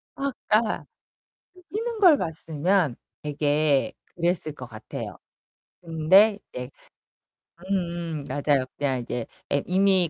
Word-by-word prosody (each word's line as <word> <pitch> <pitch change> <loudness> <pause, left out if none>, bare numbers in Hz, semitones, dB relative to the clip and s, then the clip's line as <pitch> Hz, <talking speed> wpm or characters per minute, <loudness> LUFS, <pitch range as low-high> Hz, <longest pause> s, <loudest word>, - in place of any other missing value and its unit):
아 275 0 -1 0.2
그니까 215 +1 +2 0.7
그 365 - -17
뛰는 450 +2 -3
걸 345 -7 +8
봤으면 160 -1 0 0.3
되게 145 -1 +2 0.2
그랬을 170 -3 0
것 125 - -8
같아요. 110 -2 -7 0.6
근데 185 +6 +5
이제 125 +1 -5 1.0
음 170 -5 -2
맞아요. 140 -2 +1
그냥 135 -3 0
이제 120 -1 -3 0.3
애 140 - +2
이미 190 -2 +4
165 Hz, 210 characters per minute, -26 LUFS, 145-195 Hz, 1.0 s, 걸